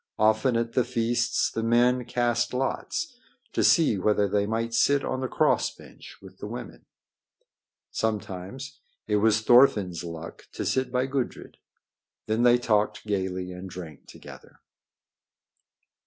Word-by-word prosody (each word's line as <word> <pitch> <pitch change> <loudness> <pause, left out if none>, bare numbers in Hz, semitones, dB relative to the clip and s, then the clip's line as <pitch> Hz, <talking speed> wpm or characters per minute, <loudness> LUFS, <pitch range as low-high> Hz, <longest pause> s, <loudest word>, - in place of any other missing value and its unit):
Often 110 +3 +3
at 115 0 -2
the 125 - +3
feasts 120 0 0
the 115 - -3
men 120 +2 +2
cast 120 0 0
lots 245 - -3 0.3
to - - +1
see 150 - +4
whether 105 +1 +2
they 100 +1 0
might 115 +1 -2
sit 140 +4 +3
on 130 - -2
the 130 - -1
cross - - +2
bench - - -14
with - - -14
the - - -6
women. - - -9 1.0
Sometimes 110 +5 -4 0.3
it 105 -1 +1
was 110 +1 +3
Thorfinn's 105 -8 +4
luck 85 -1 -9
to - - -4
sit 130 -1 0
by 125 +1 +1
Gudrid. 135 -2 -4 0.7
Then 110 +2 0
they 120 0 +6
talked 110 -4 0
gaily 95 -3 -2
and 90 +1 -8
drank 85 -5 -10
together. - - -14
115 Hz, 140 wpm, -26 LUFS, 105-125 Hz, 1.0 s, they